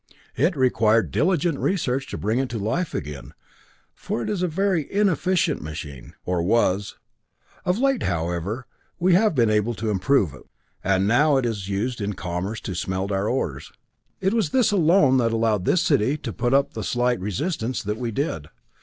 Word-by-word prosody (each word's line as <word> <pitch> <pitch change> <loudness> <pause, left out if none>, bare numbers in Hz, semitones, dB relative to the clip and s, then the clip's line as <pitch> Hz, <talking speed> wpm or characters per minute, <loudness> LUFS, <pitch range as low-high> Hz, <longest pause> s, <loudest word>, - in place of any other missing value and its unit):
It 160 +6 +2
required 115 -4 +2
diligent 165 -3 +1
research 135 -8 0
to - - -5
bring 110 +4 0
it 135 -1 -1
to 115 - -4
life 115 - -2
again, 70 -2 -6 0.6
for 120 - -4
it - - -2
is 200 -4 -2
a 180 - +2
very 180 -2 0
inefficient 185 -5 +1
machine 75 -4 -8
or 90 -1 0
was. 100 +1 +1 0.7
Of 180 +2 +1
late, 270 0 +1
however, 85 +7 -2 0.3
we 180 +1 +3
have 205 0 +3
been 115 -4 +3
able 105 +2 +1
to 110 0 -2
improve 100 - +2
it, 70 - -14 0.4
and 95 0 +2
now 145 +6 +4
it 130 - 0
is 105 -4 -3
used 110 +4 -2
in 100 +1 -2
commerce 90 +5 -4
to 95 - -5
smelt 95 +2 -2
our 100 +2 0
ores. 75 - -3 0.5
It 190 +2 +1
was 220 -9 +1
this 250 - +3
alone 165 -7 +4
that 115 -2 +1
allowed 110 -4 +1
this 180 - +3
city 140 0 +2
to - - -6
put 120 +1 +1
up 140 0 +2
the 110 - -5
slight 125 +5 0
resistance 120 - -2
that 105 +1 -3
we 120 -2 -2
did. 105 - -3
120 Hz, 180 wpm, -23 LUFS, 100-155 Hz, 0.7 s, now